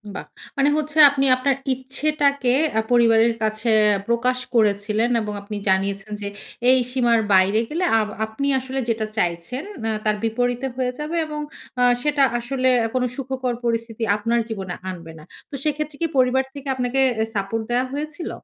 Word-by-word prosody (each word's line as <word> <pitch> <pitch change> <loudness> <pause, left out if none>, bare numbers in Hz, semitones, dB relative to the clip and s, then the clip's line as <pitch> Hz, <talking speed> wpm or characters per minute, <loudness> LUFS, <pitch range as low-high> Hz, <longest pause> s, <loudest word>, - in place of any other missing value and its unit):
বাহ! - - -6 0.3
মানে 280 +1 +4
হচ্ছে 305 0 -3
আপনি 275 -1 0
আপনার 265 +1 +1 0.2
ইচ্ছেটাকে 280 0 0 0.3
আ - - +3
পরিবারের 230 -1 +4
কাছে 215 +1 0 0.4
প্রকাশ 250 +2 +1 0.2
করেছিলেন 215 +1 +2
এবং 210 -1 -4
আপনি 205 +1 -7
জানিয়েছেন 195 +2 0
যে 200 - -3 0.4
এই 260 0 +6
সীমার 240 -3 +3
বাইরে 190 +3 +4
গেলে 335 +4 -2 0.2
আব 215 - 0 0.2
আপনি 220 +6 -4
আসলে 265 +1 -4
যেটা 220 -1 0
চাইছেন 175 - -2 0.2
ন্যা 225 - 0
তার 215 0 +2
বিপরীতে 245 +3 -1
হয়ে 255 -1 -1
যাবে 300 +3 -4
এবং 300 -1 -5 0.4
আ - - +5 0.2
সেটা 290 -1 +2 0.2
আসলে 255 +2 -1 0.3
কোন 255 - +1
সুখকর 260 -2 -3
পরিস্থিতি 230 -1 -2
আপনার 230 +3 0
জীবনে 190 -5 -5 0.2
আনবে 170 -3 -8
না। - - -13 0.3
তো - - -7
সেক্ষেত্রে 305 0 -2
কি 335 - +2
পরিবার 260 +1 +3
থেকে 280 -1 -9
আপনাকে 250 +1 -1 0.2
অ্যা 220 - +1
সাপোর্ট 205 +3 -2
দেয়া 250 +1 +2
হয়েছিল? 305 +3 -4
245 Hz, 165 wpm, -22 LUFS, 220-270 Hz, 0.4 s, এই